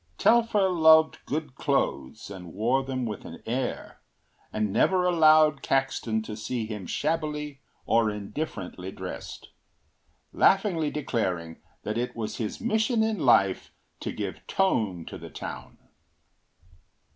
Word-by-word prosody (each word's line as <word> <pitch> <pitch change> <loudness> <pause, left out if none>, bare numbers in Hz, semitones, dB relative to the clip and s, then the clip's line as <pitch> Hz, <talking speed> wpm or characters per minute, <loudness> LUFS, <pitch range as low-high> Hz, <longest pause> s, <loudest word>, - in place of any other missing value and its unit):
Telfer 225 -4 +4
loved 160 -3 +5
good 150 -1 -3
clothes 135 -6 -2
and 90 -4 -9
wore 120 +6 +1
them 130 -2 -3
with 105 -3 -5
an - - -10
air, 125 +2 -3 0.5
and 105 -2 -1
never 185 -1 +3
allowed 155 -4 +5
Caxton 120 -5 0
to 110 -1 -6
see 110 +2 -3
him 105 -4 -6
shabbily 150 -3 -2 0.2
or 115 -1 +3
indifferently 100 - -5
dressed, - - -8 0.8
laughingly 185 -6 +3
declaring 95 - -3 0.2
that 110 +2 -2
it 125 - -3
was 110 -2 -4
his 110 -3 -4
mission 220 0 +1
in 220 -3 -1
life 100 -9 +3 0.3
to - - -4
give - - -6
tone 105 - 0
to - - -8
the - - -9
town. - - -8
130 Hz, 125 wpm, -27 LUFS, 105-160 Hz, 0.8 s, loved